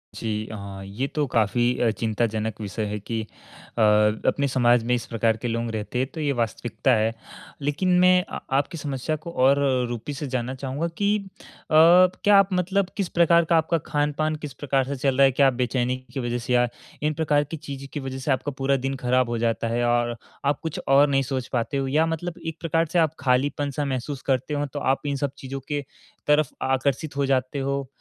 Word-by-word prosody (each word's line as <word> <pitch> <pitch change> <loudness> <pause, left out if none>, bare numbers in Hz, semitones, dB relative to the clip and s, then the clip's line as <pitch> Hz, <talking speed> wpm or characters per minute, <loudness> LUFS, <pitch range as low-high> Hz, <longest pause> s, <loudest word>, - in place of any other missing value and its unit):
जी, 110 -1 -3
हाँ, 100 -2 -7
ये 110 +8 -3
तो 150 +1 -1
काफ़ी 115 0 +1 0.2
अ, 120 - +4
चिंताजनक 110 -1 -2
विषय 105 +2 -3
है 105 0 -3
कि 110 +2 -4
अ, 110 +1 -10
अपने 105 +6 +3
समाज 120 -2 +3
में 125 +2 0
इस 120 - -4
प्रकार 115 -1 +1
के 120 - -4
लोग 115 0 -2
रहते 110 +3 -3
हैं, 130 - +1
तो 160 - -7
ये 145 -2 +1
वास्तविकता 115 -4 -1
है। 110 +1 +1 0.5
लेकिन 145 +6 0
मैं 180 0 +5
अ, - - -6
आपकी 140 +6 0
समस्या 145 0 -3
को 170 - -5
और 135 0 +3 0.3
रूपी 120 +4 -5
से 145 +1 -5
जानना 130 -1 -2
चाहूँगा 140 +5 -3
कि 205 +1 +2
अ, 200 - -10 0.5
क्या 180 +5 +6
आप 195 0 +5
मतलब 185 +1 +1
किस 195 -4 -1
प्रकार 170 0 +4
का 165 +1 +3
आपका 160 +1 +2
खान-पान 150 +1 0
किस 140 - -7
प्रकार 135 -1 0
से 140 - -3
चल 135 0 0
रहा 140 - +7
है? 135 - +4
क्या 140 +2 +4
आप 135 - +2
बेचैनी 125 0 0 0.2
की - - -3
वजह 120 -1 -2
से 125 +1 -3
या 120 0 +4 0.4
इन 155 0 +1
प्रकार 150 -1 +2
की 155 +3 -7
चीज़ों 140 -3 -8
की 145 - -3
वजह 135 -1 -5
से 135 +2 -1
आपका 135 +2 -1
पूरा 135 0 +2
दिन 135 - -1
खराब 125 -1 +1
हो 120 - -1
जाता 115 0 0
है 120 +1 0
और 120 0 +1 0.3
आप 140 0 +1
कुछ 160 -2 -3
और 140 +2 +6
नहीं 135 -1 +2
सोच 130 -1 -3
पाते 125 +3 -1
हो? 135 -1 -1
या 155 +4 +3
मतलब 165 +2 -3
एक 160 0 -4
प्रकार 165 0 +1
से 175 - +3
आप 160 -2 +2
खालीपन-सा 140 +2 0
महसूस 130 +1 -3
करते 135 +2 0
हो, 145 0 0
तो 145 +1 -6
आप 135 0 +1
इन 140 - -1
सब 140 0 -2
चीज़ों 135 +1 -6
की 145 -1 -1 0.5
तरफ 150 -2 +4
आकर्षित 135 +3 0
हो 140 - +2
जाते 135 +1 0
हो? 140 0 -2
135 Hz, 215 wpm, -24 LUFS, 120-150 Hz, 0.5 s, रहा